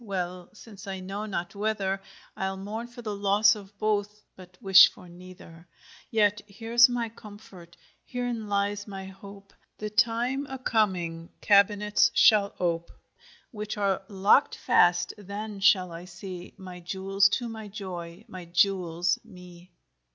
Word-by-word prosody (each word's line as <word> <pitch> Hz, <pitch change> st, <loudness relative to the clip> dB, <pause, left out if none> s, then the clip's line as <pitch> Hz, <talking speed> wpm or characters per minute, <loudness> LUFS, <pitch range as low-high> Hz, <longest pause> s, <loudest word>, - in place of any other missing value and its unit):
Well, 180 Hz, -3 st, -4 dB
since 210 Hz, -1 st, -13 dB
I 190 Hz, -1 st, -5 dB
know 195 Hz, +3 st, -5 dB
not 175 Hz, -4 st, -4 dB
whether; 200 Hz, -2 st, -2 dB, 0.3 s
Ile 190 Hz, 0 st, -3 dB
mourne 215 Hz, +5 st, -6 dB
for 240 Hz, 0 st, -12 dB
the 210 Hz, -2 st, -4 dB
losse 205 Hz, +1 st, +4 dB
of 200 Hz, -1 st, -12 dB
both, 210 Hz, 0 st, -1 dB
but 180 Hz, -1 st, -15 dB
wish 195 Hz, -1 st, +8 dB
for 180 Hz, -, -15 dB
neither, 175 Hz, -1 st, -14 dB, 0.4 s
Yet 210 Hz, -2 st, +2 dB
here's 230 Hz, +4 st, +4 dB
my 240 Hz, -1 st, -2 dB
comfort, 205 Hz, -6 st, -14 dB, 0.3 s
herein 245 Hz, -3 st, -4 dB
lyes 205 Hz, +1 st, -1 dB
my 195 Hz, -1 st, -7 dB
hope, 195 Hz, +1 st, -13 dB, 0.2 s
The 210 Hz, 0 st, -5 dB
tyme 240 Hz, +5 st, +1 dB
a 265 Hz, -, -5 dB
comeinge 180 Hz, -9 st, -1 dB
cabinets 205 Hz, 0 st, +4 dB
shall 205 Hz, -2 st, +5 dB
ope 170 Hz, -1 st, -1 dB, 0.6 s
Which 210 Hz, 0 st, -6 dB
are 200 Hz, -2 st, 0 dB
lockt 200 Hz, +7 st, +3 dB
fast: 175 Hz, 0 st, +3 dB
then 205 Hz, +1 st, -7 dB
shall 190 Hz, -2 st, +4 dB
I 170 Hz, +1 st, -8 dB
see 180 Hz, 0 st, -9 dB
My 185 Hz, -2 st, -10 dB
Jewells 195 Hz, +2 st, +1 dB
to 245 Hz, -, -1 dB
my 220 Hz, -2 st, -8 dB
joy, 185 Hz, -2 st, -8 dB
my 180 Hz, -2 st, -10 dB
Jewells 175 Hz, -1 st, +1 dB
mee. 180 Hz, 0 st, -14 dB
200 Hz, 145 wpm, -27 LUFS, 180-215 Hz, 0.6 s, wish